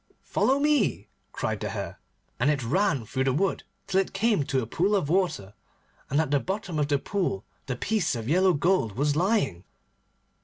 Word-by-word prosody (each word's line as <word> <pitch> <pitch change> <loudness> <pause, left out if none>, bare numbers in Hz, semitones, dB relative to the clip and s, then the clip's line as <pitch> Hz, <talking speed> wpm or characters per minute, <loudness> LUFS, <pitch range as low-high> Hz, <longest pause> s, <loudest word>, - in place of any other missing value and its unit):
'Follow 270 - +2
me,' 225 - +1 0.2
cried - - -2
the - - -3
Hare, - - -5 0.4
and 130 +5 +3
it 145 -4 +1
ran 145 - +1
through 130 +4 -1
the 135 - +3
wood 190 +8 0 0.2
till 195 0 +2
it 195 - -6
came 210 -5 +2
to 135 -1 0
a - - -4
pool 185 - +1
of 180 -8 0
water. 170 - 0 0.6
And 145 - +2
at 160 -3 0
the 145 - +4
bottom 190 -1 -3
of 145 - +1
the 145 -1 +2
pool 135 - -2 0.2
the 125 - -2
piece 190 - 0
of 115 -1 -5
yellow 185 +5 +4
gold 170 - +1
was 145 +5 +1
lying. 165 - +1
155 Hz, 190 wpm, -27 LUFS, 135-195 Hz, 0.6 s, the